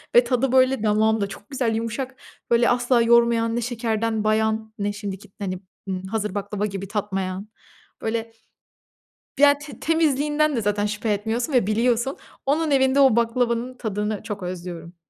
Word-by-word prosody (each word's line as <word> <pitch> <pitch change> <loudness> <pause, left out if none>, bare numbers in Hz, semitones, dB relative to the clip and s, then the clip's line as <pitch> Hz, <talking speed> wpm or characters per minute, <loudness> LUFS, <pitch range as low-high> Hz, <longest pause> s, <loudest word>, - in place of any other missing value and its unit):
ve 240 - +8
tadı 250 +1 0
böyle 260 -2 +3
damağımda, 215 0 +2
çok 205 +1 -11
güzel, 245 -4 0
yumuşak, 230 +4 -3 0.4
böyle 235 0 +4
asla 245 0 +3
yormayan, 230 -1 +4
ne 240 - 0
şekerden 225 -2 -1
bayan, 220 0 0
ne 205 0 -1
şimdiki 205 -1 -7
hani; 185 -2 -3 0.3
ımm, 185 -1 -3
hazır 210 0 -3
baklava 205 0 -2
gibi, 195 -1 -5
tatmayan. 195 -1 -3 0.5
Böyle 225 0 -2 1.1
ya, 285 0 +6
te 285 -5 -11
temizliğinden 300 -2 +2
de - - +1
zaten 205 0 0
şüphe 210 +1 -1
etmiyorsun 225 +6 -2
ve 245 -7 +3
biliyorsun. 235 +4 +1 0.3
Onun 305 +3 +1
evinde, 265 0 +4
o 265 -5 +6
baklavanın 235 +1 0
tadını, 210 -2 -2
çok 210 -3 -6
özlüyorum. 175 -1 -6
225 Hz, 150 wpm, -23 LUFS, 205-250 Hz, 1.1 s, ve